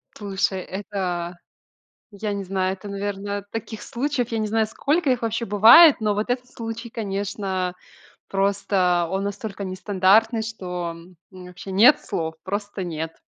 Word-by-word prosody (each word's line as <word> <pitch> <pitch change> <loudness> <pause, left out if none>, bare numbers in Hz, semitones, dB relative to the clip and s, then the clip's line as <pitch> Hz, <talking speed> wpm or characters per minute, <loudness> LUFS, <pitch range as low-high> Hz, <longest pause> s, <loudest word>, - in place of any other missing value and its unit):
Слушай, 195 -2 -1
это 180 -3 -4 0.7
я 205 +1 -4
не 200 -1 -3
знаю, 190 0 -1
это, 195 +2 -10
наверное, 200 0 -4
таких 225 -1 -6
случаев, 250 -1 -2
я 225 - -1
не 215 - -1
знаю, 220 0 +1
сколько 290 +6 0
их 250 -2 +1
вообще 230 +1 -1
бывает, 235 - +8
но 215 -1 +1
вот 210 +4 -2
этот 250 0 -1
случай, 230 -1 -7
конечно, 195 -3 -3 0.6
просто 195 -3 +1
он 195 +1 -1
настолько 200 0 -5
нестандартный, 200 +4 +2
что, 180 -6 -4
м, 170 +2 -15
у 185 - -16
меня 180 -1 -10
вообще 185 +2 -10
нет 225 +10 +6
слов, 160 -1 -3
просто 200 0 -4
нет. 160 -1 -5
200 Hz, 155 wpm, -23 LUFS, 185-225 Hz, 0.7 s, бывает